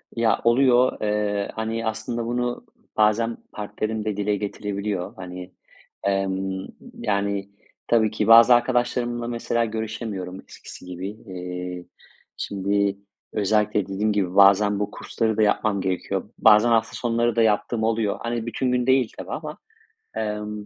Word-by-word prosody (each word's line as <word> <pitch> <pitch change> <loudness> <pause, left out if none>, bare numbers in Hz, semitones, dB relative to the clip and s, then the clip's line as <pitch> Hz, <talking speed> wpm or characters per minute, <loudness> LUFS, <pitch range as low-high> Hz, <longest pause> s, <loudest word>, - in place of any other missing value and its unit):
Ya, 115 -1 +2
oluyor. 125 +1 +4
Eee, 105 -1 -1
hani, 110 +1 -3
aslında 115 +2 -3
bunu 120 +1 -2 0.3
bazen 110 +2 +2
partnerim 110 +1 -4
de 105 -2 -2
dile 105 0 0
getirebiliyor. 100 -1 -4
Hani, 90 -2 -8 0.5
emm, 95 -1 -1 0.3
yani, 100 -1 -1 0.4
tabii 110 -2 +3
ki 105 -1 -1
bazı 115 +2 +9
arkadaşlarımla, 120 -1 0
mesela, 120 0 -1
görüşemiyorum 110 -4 -5
eskisi - - -11
gibi. 90 +2 -5
Eee, 90 -3 -7 0.5
şimdi 100 0 0 0.4
özellikle, 105 0 +1
dediğim 105 +2 0
gibi, 95 -3 -1
bazen 100 +1 +5
bu 105 0 -2
kursları 110 -2 -2
da - - +3
yapmam 105 -1 +2
gerekiyor. 95 -1 -2
Bazen 110 +2 +6
hafta 115 -1 +2
sonları 120 -1 0
da 115 - +3
yaptığım 110 +1 +1
oluyor. 110 -2 0
Hani, 115 -1 -2
bütün 125 +2 -1
gün 125 0 0
değil 130 -3 +3
tabii - - -7
ama, - - -5 0.6
emm, 105 -1 -4
105 Hz, 135 wpm, -24 LUFS, 100-115 Hz, 0.6 s, bazı